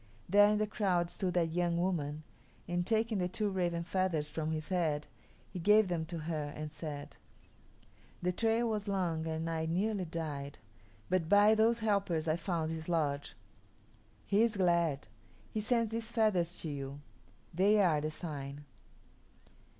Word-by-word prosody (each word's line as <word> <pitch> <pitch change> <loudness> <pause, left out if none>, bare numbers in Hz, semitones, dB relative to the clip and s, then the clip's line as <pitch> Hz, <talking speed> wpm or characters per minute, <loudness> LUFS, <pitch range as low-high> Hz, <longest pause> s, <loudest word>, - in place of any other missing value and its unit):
There 205 +3 +6
in 210 - +2
the 215 - +1
crowd 185 -5 0
stood 180 -1 -2
that 165 -2 +2
young 170 0 +1
woman, 155 -4 -1 0.4
and, 175 +1 -1
taking 225 -1 +1
the 180 - +1
two 205 +3 -1
raven 175 -3 -1
feathers 175 -4 0
from 155 0 -3
his 155 -1 -4
head, 160 -5 0 0.5
he 185 - -5
gave 210 +3 +5
them 165 -2 -1
to 170 0 -5
her 155 -2 -3
and 155 0 -5
said, 150 -2 -7 1.0
"The 180 0 0
trail 225 +4 +1
was 215 -2 -2
long 175 -5 -1
and 160 0 -2
I 160 -1 -1
nearly 190 +3 0
died, 150 -4 -5 0.5
but 180 -3 0
by 205 +1 +7
those 225 +1 +3
helpers 195 -6 +1
I 155 - +2
found 165 -2 -2
his 160 +1 -5
lodge. 145 -4 -1 0.9
He 200 +2 +3
is 230 -2 +2
glad. 170 - +2 0.4
He 215 - -2
sends 230 0 +1
these 230 0 -3
feathers 190 -7 +1
to 160 - -4
you. 140 0 -6 0.5
They 200 +5 +4
are 165 -7 +3
the 155 - -1
sign." 145 -3 -6
175 Hz, 160 wpm, -33 LUFS, 160-205 Hz, 1.0 s, by